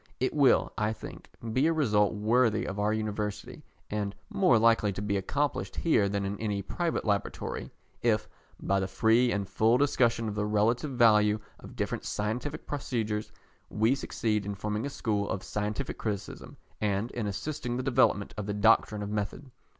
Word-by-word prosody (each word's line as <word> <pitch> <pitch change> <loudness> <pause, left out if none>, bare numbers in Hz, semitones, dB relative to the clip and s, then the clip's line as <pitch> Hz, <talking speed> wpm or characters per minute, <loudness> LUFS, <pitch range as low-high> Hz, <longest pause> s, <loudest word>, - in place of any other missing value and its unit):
It 130 - 0
will, 140 -4 +4
I 105 +1 +1
think, - - -10 0.2
be 130 +6 +3
a 165 - +3
result 110 -9 +2
worthy 110 +1 +2
of 100 +1 -4
our 105 +1 +2
University, 105 -1 -3 0.3
and 105 -1 -2 0.2
more 180 -12 +4
likely 115 -2 +4
to - - -6
be 100 0 -1
accomplished 110 -1 -1
here 105 -12 +2
than 100 0 -1
in 100 +1 -4
any 105 -3 -2
private 170 -2 -2
laboratory, 100 -2 -2 0.3
if, 110 -3 +1 0.3
by 100 0 +1
the 95 - -1
free 115 +5 +3
and 100 -1 -1
full 110 +5 +3
discussion 120 -5 +2
of 105 - -2
the 105 0 -1
relative 110 +7 +1
value 110 -4 +4 0.2
of - - -12
different - - -2
scientific 120 +8 -3
procedures, 110 -7 -3 0.4
we 110 +4 +2
succeed 110 -6 -1
in 100 0 -4
forming 105 +5 -2
a - - -4
school 105 -6 -1
of 95 - -3
scientific 105 +5 -3
criticism, 105 -2 -5 0.2
and 105 +3 0
in 115 -4 -3
assisting 120 +4 -3
the 130 - -2
development 130 -6 +2
of 105 -1 -4
the 105 - -2
doctrine 105 0 +3
of 100 - -5
method. 105 +6 -4
105 Hz, 175 wpm, -29 LUFS, 105-120 Hz, 0.4 s, will